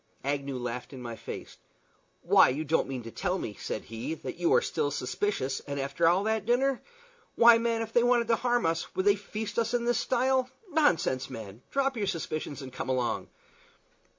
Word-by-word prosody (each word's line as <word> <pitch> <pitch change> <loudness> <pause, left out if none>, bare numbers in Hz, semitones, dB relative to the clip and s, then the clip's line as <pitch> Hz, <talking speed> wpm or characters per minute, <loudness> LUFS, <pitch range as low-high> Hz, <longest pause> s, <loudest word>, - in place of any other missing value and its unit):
Agnew 140 -1 -2
laughed 125 +2 -5
in 130 - -8
my 120 -1 -5
face. - - -8 0.7
"Why, - - +6
you 145 +5 -2
don't 160 +3 +1
mean 130 -3 -5
to 115 - -8
tell 185 - -1
me," 110 - -4
said - - -5
he, 115 +8 -5
"that - - -7
you 175 -1 +1
are - - +5
still 145 - -1
suspicious, 140 0 -2
and 140 0 -3
after 140 +4 0 0.2
that 220 -1 -1
dinner? 260 +2 +2 0.5
Why, 235 0 +7
man, 230 -1 0
if 225 0 -9
they 240 - +5
wanted 240 -1 +3
to 230 - +5
harm 245 -1 +1
us, 165 0 -1
would 190 - 0
they 205 0 +6
feast 210 +2 -4
us 230 +1 0
in 235 -1 0
this 240 -1 +2
style? 255 +1 +1 0.2
Nonsense, 175 - +2
man! 110 -3 -8
Drop 275 -2 0
your 205 -2 -1
suspicions 155 -5 -3
and 130 -1 -9
come - - -5
along." 125 -2 -1
175 Hz, 195 wpm, -29 LUFS, -, 0.7 s, Why